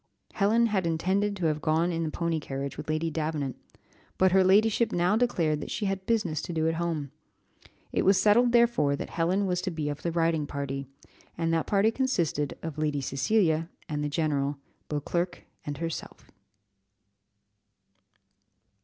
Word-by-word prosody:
Helen 220 +4 +3
had 195 -6 0
intended 190 +5 0
to 185 -4 -3
have 155 -1 0
gone 165 +3 +2
in 165 -1 -2
the 160 - -1
pony 170 0 -1
carriage 140 -1 -5
with - - -8
Lady 155 +1 0
Davenant, 150 -4 -2 0.6
but 185 0 +4
her 190 +1 +5
ladyship 215 +4 +4
now 175 +4 +2
declared 170 -11 +1
that - - -6
she 210 - -2
had 195 -1 -2
business 210 -9 0
to - - -6
do 160 0 +1
at 165 - +1
home; 155 -5 -2 0.8
it - - +1
was 195 0 +4
settled 220 +5 +4
therefore 235 -12 +3
that - - -6
Helen 180 +4 +1
was 180 -1 0
to 185 - -2
be 155 -4 -3
of 145 - -5
the 170 - -1
riding 165 -2 +1
party, 140 -1 -4 0.5
and 165 -1 0
that 165 - 0
party 205 +2 +3
consisted 175 - -1
of 160 -2 -5
Lady 150 -2 0
Cecilia 160 - +1 0.2
and 150 -1 -2
the 145 - -1
general, 145 -2 0 0.3
Beauclerc 170 +4 -2 0.2
and 145 -1 -3
herself. 165 +1 -6
165 Hz, 165 wpm, -28 LUFS, 150-195 Hz, 0.8 s, her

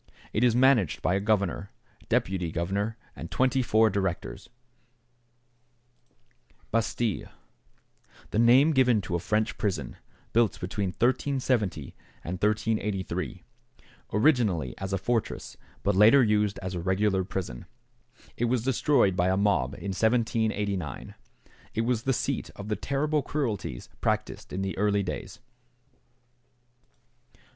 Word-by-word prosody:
It 110 - +1
is 120 -2 +4
managed 125 - +3
by 90 - +2
a 95 - +2
governor, 100 -2 0 0.4
deputy 90 -3 0
governor, 100 +7 -2 0.2
and - - -7
twenty 130 0 +2
four 110 -2 +3
directors. 100 +2 -3 2.2
=Bastile.= 115 -2 -1 1.0
The 110 - 0
name 125 +6 +6
given 125 -6 +3
to 95 - -6
a 85 - +1
French 110 +5 -1
prison, 85 - -2 0.4
built 115 -2 +2
between 95 +2 -2
1370 120 - 0 0.3
and 90 +2 -5
1383, 105 -2 -1 0.7
originally 105 - +2
as 95 0 -4
a 95 - +1
fortress, 115 +4 -2 0.3
but 100 -1 +1
later 110 +7 +7
used 105 -2 +1
as 95 0 -4
a 90 - -3
regular 95 +2 +1
prison. 90 -10 -5 0.7
It 120 - 0
was 120 -1 0
destroyed 130 -6 +2
by 90 0 +2
a 95 +1 +2
mob 100 -11 +1
in 100 - -5
1789. 110 - 0 0.6
It 110 - +1
was 115 -1 0
the 135 - 0
seat - - -2
of 105 +1 -8
the 105 - +1
terrible 145 +7 0
cruelties 115 - -3
practiced - - -2
in 95 - -3
the 95 - -3
early 100 -1 +2
days. 95 +2 -5
105 Hz, 125 wpm, -27 LUFS, 95-120 Hz, 2.2 s, later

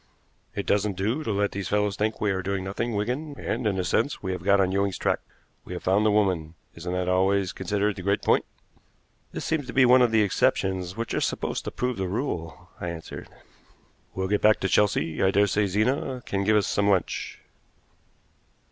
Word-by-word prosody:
"It - - -3
doesn't 100 -1 +1
do 110 +10 0
to 110 - -2
let 100 0 0
these 100 -2 -4
fellows 105 -1 +1
think 110 +1 -1
we 105 -1 +1
are 95 -1 -1
doing 95 0 -2
nothing, 105 +4 -3
Wigan; 130 +8 -3
and, 115 - -2
in 100 -2 0
a 95 - 0
sense, 140 +8 0
we 95 - -2
have 90 -2 -4
got 100 +1 +4
on 95 -1 +2
Ewing's 100 0 0
track. - - 0 0.4
We - - -8
have - - -6
found 100 +3 +3
the - - +4
woman. 90 -6 +1 0.2
Isn't 90 0 -5
that 90 0 -1
always 95 +1 +2
considered 100 +2 -1
the 95 - -7
great 100 +2 0
point?" - - +3 0.9
"This - - -5
seems 155 -5 -1
to 125 - -6
be 135 -1 +5
one 125 +1 +6
of 120 - +5
the 110 -1 +3
exceptions 95 -1 0
which 115 0 -3
are - - 0
supposed - - -2
to - - -3
prove 125 -2 -2
the 95 -1 -2
rule," 90 - -4
I 90 - -3
answered. 85 -1 -8 0.9
"We'll 95 0 -1
get 105 +1 +1
back 110 0 +5
to 95 - +1
Chelsea. 80 -6 +1
I 95 - +4
daresay 100 +1 +2
Zena 125 +5 0
can 100 0 -1
give 110 +1 +4
us 105 - +2
some 100 0 +1
lunch." 95 -3 -1
100 Hz, 210 wpm, -26 LUFS, 95-110 Hz, 0.9 s, one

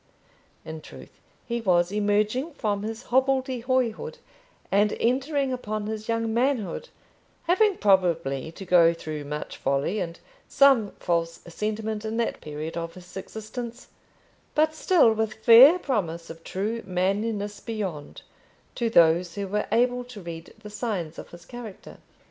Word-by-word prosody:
In 160 0 -7
truth, - - -13 0.3
he 235 0 -2
was 175 -3 +2
emerging 210 +8 0
from 205 -3 -1
his 220 +2 -5
hobbledehoyhood 260 - +1 0.5
and 205 +1 +3
entering 270 +2 +1
upon 215 -4 -3
his 215 +1 -5
young 230 -1 0
manhood, 250 - 0 0.5
having 390 +3 +3
probably 170 -8 +2
to 195 - -9
go 170 -2 +5
through 155 -3 -6
much 150 +1 -5
folly 140 +9 0
and 170 -2 -4 0.3
some 270 -7 +5
false 165 -1 -1
sentiment 215 +4 -3
in 220 +1 -3
that 235 - -1
period 150 +2 -6
of 165 0 -5
his 180 -1 -13
existence, 230 +5 -7 0.7
but 310 +1 +3
still 315 -7 +4
with 220 -1 -1
fair 255 +9 +9
promise 170 - -2
of 165 0 -12
true 215 +5 -3
manliness 205 +3 -1
beyond, 195 -10 -5 0.5
to 235 -2 -1
those 170 -2 +4
who 200 -1 -3
were 210 +2 -1
able 245 +2 +2
to 245 -4 -10
read 170 -2 -8
the 210 - -9
signs 200 -8 -3
of - - -10
his 175 0 -13
character. 235 -4 -10
210 Hz, 140 wpm, -26 LUFS, 175-240 Hz, 0.7 s, fair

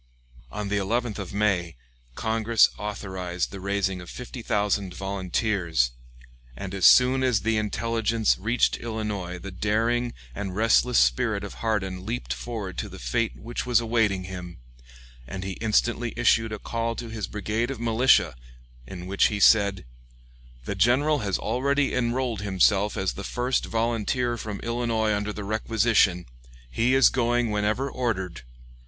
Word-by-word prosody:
On 105 -1 -4
the 100 - 0
11th 110 +3 -1
of 95 -3 -6
May, 100 -5 0 0.4
Congress 110 0 +3
authorized 95 -4 -4
the 100 - -7
raising 95 -1 -1
of 90 - -10
fifty 125 0 -8
thousand 100 -4 -1
volunteers, 95 - 0 0.7
and 95 +6 -6
as 95 -2 +5
soon 130 +1 +6
as 125 -6 +2
the 110 +1 +1
intelligence 115 +1 0
reached 110 +5 +1
Illinois 105 -6 -4
the 95 +2 -8
daring 115 +5 0 0.2
and 95 +2 -5
restless 115 +3 +3
spirit 100 - +2
of 100 - -6
Hardin 95 -5 -2
leaped 115 +5 -3
forward 110 -6 -5
to - - -4
the - - -10
fate - - -1
which 120 - -5
was 120 -2 +4
awaiting 110 -5 +1
him, 90 -2 -8 0.7
and 95 +7 -6
he 95 - -4
instantly 115 +2 +1
issued 115 -1 +3
a 110 - -3
call 115 +2 -3
to 115 0 -6
his 110 -4 -4
brigade 110 +3 -2
of 135 -4 -5
militia, 115 - +3 0.5
in 90 +4 -8
which 95 +1 +3
he 105 - -3
said: 100 - +4 0.8
"The - - -2
general 130 +10 +3
has 100 -5 -1
already 140 +4 0
enrolled 120 -3 -1
himself 100 +1 +2
as 95 -1 -1
the 100 - -7
first 125 +4 -1
volunteer 120 +2 0
from 105 -3 -6
Illinois 115 -2 0
under 105 +1 -2
the 105 0 -6
requisition. 110 -3 +2 0.5
He 120 - +2
is 135 - +6
going 120 -2 +1
whenever 105 +6 0
ordered. 95 - -3
105 Hz, 150 wpm, -25 LUFS, 95-115 Hz, 0.8 s, soon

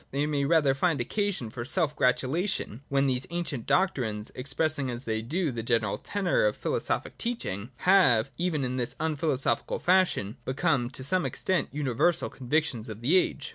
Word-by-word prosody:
They 140 +2 -1
may 145 -2 0
rather 145 -3 +3
find 155 +1 +1
occasion 180 - -2
for 120 +1 -5
self 150 +3 +1
gratulation 130 - 0
when 140 0 +2
these 130 -1 -1
ancient 170 -8 -4
doctrines, 120 - 0
expressing 140 +1 0
as 120 +1 -4
they 110 -2 -2
do 155 +7 -1
the 115 -2 -4
general 110 -3 0
tenor 205 - 0
of - - -2
philosophic - - -2
teaching, 125 - -3
have, 135 - +4
even 160 -5 -1
in 125 +1 -3
this 125 +1 -1
unphilosophical 155 -3 0
fashion, 180 - +2
become 130 -2 0
to 130 0 -6
some 180 +6 +3
extent 170 +7 -1
uni 145 -2 -2
versal 170 +8 +2
convictions 125 -3 -1
of 110 0 -8
the 145 +10 +2
age. 150 -5 +1
140 Hz, 170 wpm, -27 LUFS, 120-170 Hz, -, have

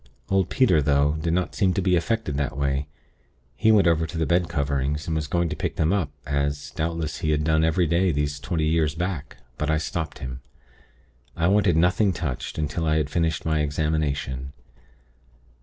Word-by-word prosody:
Old 95 -2 +2
Peter, 90 -12 +3
though, 70 +1 +2
did 85 - 0
not 90 +2 0
seem 95 -4 +1
to - - +1
be 90 -1 +3
affected 85 -3 -1
that 70 -2 -2
way. 70 0 0 0.7
He 110 - +3
went 105 -3 +5
over 80 -1 +2
to 85 - -7
the 80 - +1
bed 85 +3 +1
coverings, 70 -1 -1
and 80 - -2
was 75 -1 -1
going 85 +3 +1
to - - -3
pick - - -3
them 80 +4 +1
up, 95 -8 0 0.2
as, 70 0 -2
doubtless, 80 -1 -3
he 80 - -1
had 75 -1 +1
done 80 +1 +2
every 80 +2 +2
day 85 +3 +2
these 75 -1 -1
twenty 80 0 -1
years 80 -1 +1
back; 85 -3 -4 0.2
but 75 - -1
I 80 - +3
stopped 80 0 -3
him. 65 0 -7 1.0
I 85 - +2
wanted 100 -4 +3
nothing 90 +4 +3
touched, 75 -7 -4
until 75 +2 -2
I 80 0 +3
had 75 -1 -1
finished 80 -2 0
my 80 -1 +1
examination. 70 -3 -1
80 Hz, 190 wpm, -24 LUFS, 75-85 Hz, 1.0 s, went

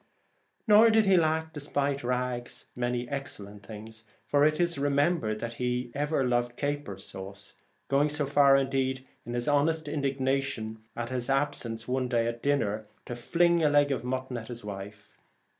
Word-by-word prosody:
Nor 215 +2 +8
did 220 -1 +4
he 195 -1 +5
lack, 160 -1 +1
despite 145 -1 -1
his 140 - -11
rags, 125 -1 -2
many 120 0 -1
excellent 105 -7 -6
things, 110 +1 -10 0.2
for 145 0 +3
it 155 +1 +3
is 170 -4 +1
re 145 +1 +1
membered 140 -6 +1
that 115 0 -4
he 125 0 -1
ever 145 -1 0
loved 120 0 0
caper 145 -8 -3
sauce, 95 +1 -9 0.3
going 140 +2 +3
so 150 0 -1
far 140 0 +5
indeed 130 -1 0 0.2
in 120 - -3
his 120 0 -2
honest 155 +2 +2
indig 140 -2 -2
nation 130 -5 -1
at 120 +1 -4
its 125 -1 -2
absence 135 -5 -1
upon 125 - -4
one 130 -1 +1
occasion 120 +5 +1
as 105 +2 -3 0.2
to 120 - -5
fling 170 +7 +2
a 150 - +5
leg 145 0 +4
of 130 - -1
mutton 130 0 -3
at 110 -1 -7
his 120 -1 -7
wife. 105 +1 -9
130 Hz, 175 wpm, -29 LUFS, 120-145 Hz, 0.3 s, Nor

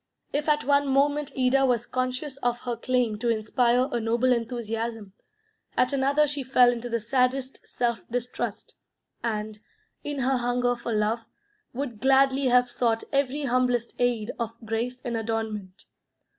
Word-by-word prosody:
If 295 +2 0
at 300 0 +2
one 285 0 +3
moment 285 +2 +2
Ida 260 +1 +3
was 245 -3 +2
conscious 255 +2 -3
of 245 -2 -1
her 245 -1 -3
claim 235 -2 0
to 240 +1 0
inspire 235 +3 +2
a 240 - 0
noble 235 +3 +2
enthusiasm, 225 -3 -3 0.6
at 255 +2 +3
another 280 +2 +3
she 290 -1 -2
fell 250 -2 +5
into 240 0 -5
the 235 0 0
saddest 255 +3 0
self 235 -1 0
distrust, 245 +1 -4 0.4
and, 215 -2 -3 0.4
in 290 -2 -3
her 260 +1 +2
hunger 245 0 +1
for 235 0 -5
love, 220 +1 0 0.4
would 245 -4 -5
gladly 270 +1 +4
have 250 0 +4
sought 235 -2 0
every 280 +1 +1
humblest 250 -2 +1
aid 240 -3 +1
of 230 -1 -2
grace 235 +3 -2
and 240 -1 -2
adornment. 220 -4 -4
245 Hz, 150 wpm, -26 LUFS, 230-265 Hz, 0.6 s, fell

